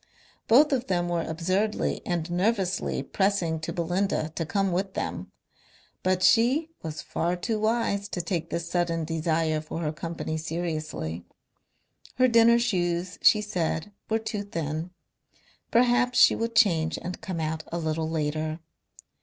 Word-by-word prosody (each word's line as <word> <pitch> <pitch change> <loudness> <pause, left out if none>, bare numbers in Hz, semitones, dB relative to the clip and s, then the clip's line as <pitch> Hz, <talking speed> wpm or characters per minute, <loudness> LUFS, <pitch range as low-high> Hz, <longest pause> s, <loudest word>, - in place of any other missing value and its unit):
Both 285 +7 +6
of 260 -2 0
them 175 -2 0
were 170 -1 0
absurdly 185 +7 -1
and 175 -1 -2
nervously 190 0 0
pressing 190 -5 0
to 155 - -4
Belinda 175 -1 -1
to 165 -1 -3
come 195 +1 +1
with 190 +2 -2
them, - - -4 0.7
but 185 0 +1
she 245 - +4
was 155 -1 -6
far 175 +2 -1
too 215 +5 -2
wise 215 -2 0
to 180 - -4
take 170 -1 -2
this 170 0 -3
sudden 170 -2 0
desire 160 -1 0
for 155 +2 -6
her 150 -2 -1
company 160 +1 -4
seriously. 155 - -4 0.9
Her 255 0 +4
dinner 235 0 +6
shoes, 180 -6 -1
she 210 - +6
said, 185 -2 -2 0.2
were 220 - +2
too 220 -2 -4
thin. 165 -4 -4 0.8
Perhaps 245 +1 +3
she - - +7
would 230 0 -3
change 165 -7 +3
and 180 +1 -6
come 180 -3 -4
out 160 0 -2
a 170 - -2
little 160 -1 -1
later. 155 0 -2
175 Hz, 145 wpm, -27 LUFS, 160-210 Hz, 0.9 s, she